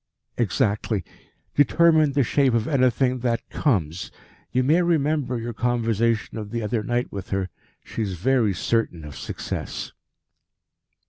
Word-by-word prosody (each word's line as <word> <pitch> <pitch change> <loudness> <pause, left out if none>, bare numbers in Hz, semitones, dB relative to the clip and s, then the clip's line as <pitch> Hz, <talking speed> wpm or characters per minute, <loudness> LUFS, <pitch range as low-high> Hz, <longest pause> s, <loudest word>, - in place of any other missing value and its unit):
"Exactly. 105 -1 0 0.5
Determine 155 +1 +4
the 140 -1 +3
shape 130 0 +2
of 115 0 +1
anything 130 -2 +2
that 120 -1 -1
comes. 90 - 0 0.4
You 130 +1 +2
may 155 +7 +4
remember 150 -6 +1
your 115 +1 -4
conversation 115 -2 0
of 105 -1 -6
the 115 +1 -3
other 110 +1 0
night 120 +3 -1
with 100 -1 -6
her. 95 -1 -1 0.3
She - - -5
is 100 -4 -2
very 115 +1 +2
certain 90 -6 -1
of 75 - -9
success." - - -5
115 Hz, 135 wpm, -24 LUFS, 105-130 Hz, 0.5 s, Determine